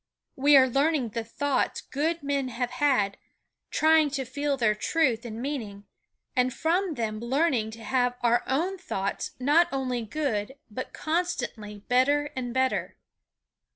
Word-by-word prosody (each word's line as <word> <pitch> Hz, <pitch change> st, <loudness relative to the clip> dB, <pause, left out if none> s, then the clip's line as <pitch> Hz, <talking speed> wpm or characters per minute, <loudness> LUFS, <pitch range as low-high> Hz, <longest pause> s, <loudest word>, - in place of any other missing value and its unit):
We 285 Hz, +1 st, +6 dB
are 260 Hz, -1 st, +6 dB
learning 275 Hz, -1 st, +1 dB
the 230 Hz, +1 st, -3 dB
thoughts 275 Hz, +4 st, -1 dB
good 320 Hz, +3 st, -2 dB
men 280 Hz, -2 st, 0 dB
have 245 Hz, 0 st, -3 dB
had, 250 Hz, -7 st, +1 dB, 0.5 s
trying 315 Hz, -1 st, +4 dB
to 265 Hz, -, -3 dB
feel 285 Hz, +3 st, -1 dB
their 230 Hz, -4 st, +3 dB
truth 245 Hz, 0 st, 0 dB
and 225 Hz, -1 st, -6 dB
meaning, 225 Hz, -7 st, -5 dB, 0.5 s
and 250 Hz, 0 st, +2 dB
from 335 Hz, +4 st, 0 dB
them 220 Hz, -3 st, -2 dB
learning 250 Hz, -1 st, +1 dB
to 225 Hz, -, -11 dB
have 245 Hz, 0 st, +1 dB
our 240 Hz, 0 st, +3 dB
own 350 Hz, +8 st, 0 dB
thoughts 200 Hz, -, -3 dB
not 300 Hz, +7 st, +4 dB
only 255 Hz, -3 st, -1 dB
good 230 Hz, -1 st, -2 dB, 0.2 s
but 255 Hz, +5 st, -5 dB
constantly 245 Hz, -, -3 dB
better 285 Hz, +4 st, +2 dB
and 250 Hz, -2 st, -3 dB
better. 260 Hz, +1 st, 0 dB
260 Hz, 145 wpm, -27 LUFS, 235-290 Hz, 0.5 s, We